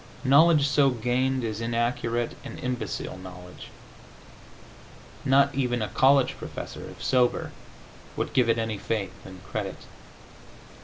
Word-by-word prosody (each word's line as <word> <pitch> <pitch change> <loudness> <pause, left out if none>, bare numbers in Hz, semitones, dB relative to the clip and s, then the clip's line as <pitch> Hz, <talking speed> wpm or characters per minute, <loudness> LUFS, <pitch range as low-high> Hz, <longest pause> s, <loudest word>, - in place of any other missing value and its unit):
Knowledge 145 +2 +5
so 140 -1 +4
gained 125 +2 0
is 110 -1 -3
inaccurate 120 0 -1
and - - -8
imbecile 125 -6 -4
knowledge. 90 -1 -11 1.6
Not 140 +1 +4
even 125 -4 0
a 105 - -3
college 135 0 +3
professor, - - -7
if - - -11
sober, 125 -2 +1 0.7
would - - -2
give 125 -3 +3
it 115 - +3
any 110 -2 -2
faith 100 -3 -2
and 95 -1 -12
credit. - - -5
120 Hz, 120 wpm, -26 LUFS, 110-130 Hz, 1.6 s, Knowledge